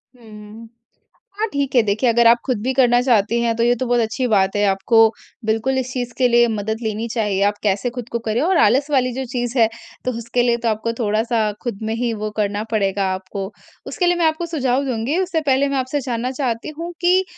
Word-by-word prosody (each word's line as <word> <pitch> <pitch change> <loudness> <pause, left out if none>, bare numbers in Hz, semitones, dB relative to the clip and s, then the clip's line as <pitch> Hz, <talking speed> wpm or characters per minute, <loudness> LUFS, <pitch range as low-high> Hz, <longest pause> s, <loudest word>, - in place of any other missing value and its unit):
हुँ, 245 - -20
हुँ। 210 +2 -11 0.7
हाँ 440 +1 0
ठीक 280 -1 -1
है, 245 - +7
देखिए, 215 +4 +1
अगर 235 0 +4
आप 235 +1 +6
खुद 250 -6 -1
भी 255 +4 0
करना 245 -2 +4
चाहती 235 -2 +2
हैं 230 -1 +1
तो 230 - 0
ये 240 +1 +4
तो 255 - -3
बहुत 245 0 +2
अच्छी 225 +3 -1
बात 195 -3 +2
है 205 - +1
आपको 225 +4 +4 0.4
बिल्कुल 225 +5 0
इस 255 -1 -2
चीज़ 245 -2 -4
के 255 - +4
लिए 240 0 +4
मदद 220 0 -2
लेनी 220 +1 -2
चाहिए। 210 -4 0
आप 205 0 0
कैसे 205 +4 0
खुद 245 -1 -6
को 235 - -1
करें 225 0 -1
और 360 +4 +2
आलस 270 +7 +3
वाली 255 -3 +2
जो 265 +2 -4
चीज़ 245 0 -3
है 225 -2 +5 0.4
तो 255 - +1
उसके 235 +1 -1
लिए 240 -1 +2
तो 230 - +2
आपको 220 +1 -2
थोड़ा-सा 220 0 0
खुद 235 -5 -4
में 220 0 -2
ही 235 0 -1
वो 215 -1 -4
करना 205 0 -1
पड़ेगा 195 -2 0
आपको। 190 +1 -6 0.4
उसके 365 - -1
लिए 355 0 +3
मैं 340 - +2
आपको 315 +2 0
सुझाव 275 -5 0
दूँगी 255 +4 -1
उससे 355 -4 -1
पहले 280 -1 +2
मैं 275 - -1
आपसे 260 +3 -1
जानना 250 -1 -3
चाहती 250 -3 -3
हूँ 340 +1 -4
कि 365 +2 +4
235 Hz, 230 wpm, -20 LUFS, 220-260 Hz, 0.7 s, है